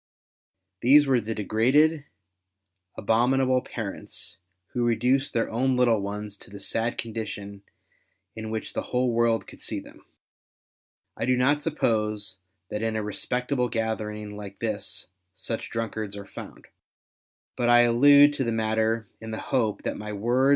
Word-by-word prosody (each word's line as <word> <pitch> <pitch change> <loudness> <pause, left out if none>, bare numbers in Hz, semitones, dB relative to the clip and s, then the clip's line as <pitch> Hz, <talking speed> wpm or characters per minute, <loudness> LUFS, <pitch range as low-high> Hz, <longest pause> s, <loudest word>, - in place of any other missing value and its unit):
These 145 +4 +7
were 130 -3 +3
the 110 +1 -4
degraded, 135 +9 +3 0.9
abominable 130 +4 +2
parents 110 -6 -7 0.4
Avho 120 - 0
reduced 125 +4 +2
their 115 - 0
own 130 +3 +1
little 120 -3 +4
ones 105 +1 -5
to - - -13
the 100 0 -10
sad 115 +4 -2
condition 105 -3 -5 0.7
in 110 0 -5
which 110 0 -4
the - - -1
Avhole 125 0 0
world 115 -1 +2
could - - -13
see - - -3
them. - - -15 1.1
I - - -2
do 125 0 +3
not 145 +4 +3
suppose 105 - 0 0.3
that 105 - -3
in 110 0 -1
a 110 - -1
respectable 125 +4 -1
gathering 105 -2 -3
like 100 -1 -8
this 110 -4 -3 0.3
such 110 +4 -4
drunkards 110 -3 -3
are 100 - -7
found, - - -10 0.9
but 120 -1 +1
I 120 0 +7
allude 145 +5 +7
to 140 - -1
the 115 - -1
matter 110 0 0
in 110 - -8
the 110 - -4
hope 115 -6 0
that - - -2
my 105 0 -6
words 120 +6 +2
r. - - +4
115 Hz, 150 wpm, -26 LUFS, 105-125 Hz, 1.1 s, These